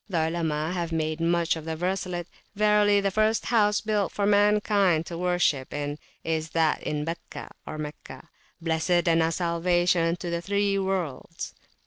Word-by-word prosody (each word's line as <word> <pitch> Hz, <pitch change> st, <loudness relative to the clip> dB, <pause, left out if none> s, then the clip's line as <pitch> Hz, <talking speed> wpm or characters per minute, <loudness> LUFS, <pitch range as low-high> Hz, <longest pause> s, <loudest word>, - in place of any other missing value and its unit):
The 180 Hz, -, -1 dB
Olema 160 Hz, -1 st, -1 dB
have 170 Hz, -2 st, -2 dB
made 155 Hz, 0 st, -1 dB
much 170 Hz, 0 st, +2 dB
of 160 Hz, -, -7 dB
the 160 Hz, 0 st, -3 dB
verselet: 180 Hz, 0 st, -2 dB, 0.3 s
Verily 210 Hz, -1 st, +4 dB
the 195 Hz, 0 st, 0 dB
first 215 Hz, +2 st, +1 dB
house 210 Hz, -3 st, +3 dB
built 210 Hz, -4 st, 0 dB
for 200 Hz, -, -1 dB
mankind 205 Hz, -4 st, +3 dB
(to 170 Hz, -, -6 dB
worship 175 Hz, -6 st, +1 dB
in) 145 Hz, +1 st, -3 dB, 0.2 s
is 160 Hz, -1 st, -2 dB
that 160 Hz, -2 st, +2 dB
in 150 Hz, 0 st, -2 dB
Bakkah[FN#65] 165 Hz, +1 st, -7 dB, 0.3 s
(Meccah), 150 Hz, 0 st, -8 dB, 0.3 s
blessed 165 Hz, +1 st, +1 dB
and 165 Hz, 0 st, +4 dB
a 160 Hz, 0 st, +2 dB
salvation 175 Hz, 0 st, +1 dB
to 175 Hz, -1 st, -5 dB
the 170 Hz, 0 st, -1 dB
three 200 Hz, +1 st, +1 dB
worlds. 175 Hz, -5 st, -3 dB
175 Hz, 155 wpm, -26 LUFS, 160-200 Hz, 0.3 s, Verily